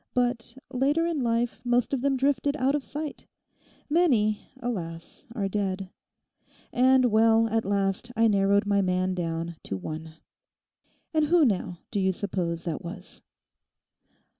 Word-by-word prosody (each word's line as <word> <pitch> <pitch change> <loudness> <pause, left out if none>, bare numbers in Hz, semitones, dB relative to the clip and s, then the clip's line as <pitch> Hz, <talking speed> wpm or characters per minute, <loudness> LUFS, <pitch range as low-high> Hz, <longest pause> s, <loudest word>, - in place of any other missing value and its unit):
But 245 0 0 0.2
later 285 +6 +2
in 335 -3 -1
life 235 0 0
most 245 +1 +1
of 265 - 0
them 275 0 +1
drifted 280 +2 +1
out 270 0 +2
of 290 -2 -1
sight—many, 290 -4 -2 0.2
alas, 170 -9 -5
are 200 -5 0
dead; 195 -1 -2 0.8
and, 255 +1 +5
well, 225 +1 +5
at 225 +1 0
last 200 +3 0
I 225 +1 +4
narrowed 200 -1 +3
my 200 -1 +2
man 185 0 +1
down 165 -1 -3
to 95 - -4
one. 155 - -7 1.0
And 310 -1 +3
who 335 -1 +5
now, 180 -5 -1
do 205 - 0
you 190 -1 +2
suppose 175 -4 -3
that 165 -3 -4
was? 170 +3 -7
220 Hz, 140 wpm, -27 LUFS, 185-255 Hz, 1.0 s, and